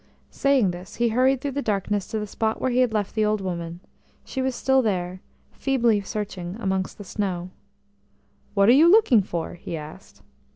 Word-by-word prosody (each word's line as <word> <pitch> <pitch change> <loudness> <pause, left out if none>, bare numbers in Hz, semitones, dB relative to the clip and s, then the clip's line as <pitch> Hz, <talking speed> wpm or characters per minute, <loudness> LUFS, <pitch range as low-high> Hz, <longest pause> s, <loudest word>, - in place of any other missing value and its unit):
Saying 275 -9 +2
this, 175 +1 -9
he 235 0 +1
hurried 255 +3 +2
through 285 - -2
the 280 +2 -2
darkness 205 -3 -1
to 220 - -3
the 210 - -2
spot 220 +2 -2
where 260 - 0
he 245 - +1
had 250 -2 +3
left 210 -2 -1
the 215 - +1
old 210 0 +1
woman; 170 -2 -5 0.4
she 265 - -4
was 260 -1 -1
still 265 +2 +3
there, 185 -4 -2 0.3
feebly 240 -6 +1
searching 195 -3 -5
amongst 190 -3 -2
the 205 - -8
snow. 185 -3 -3 1.0
"What 200 0 +4
are - - +8
you 305 +7 +7
looking 360 - +6
for?" 170 -3 -4
he 170 -1 -6
asked. 150 0 -11
210 Hz, 190 wpm, -24 LUFS, 185-250 Hz, 1.0 s, are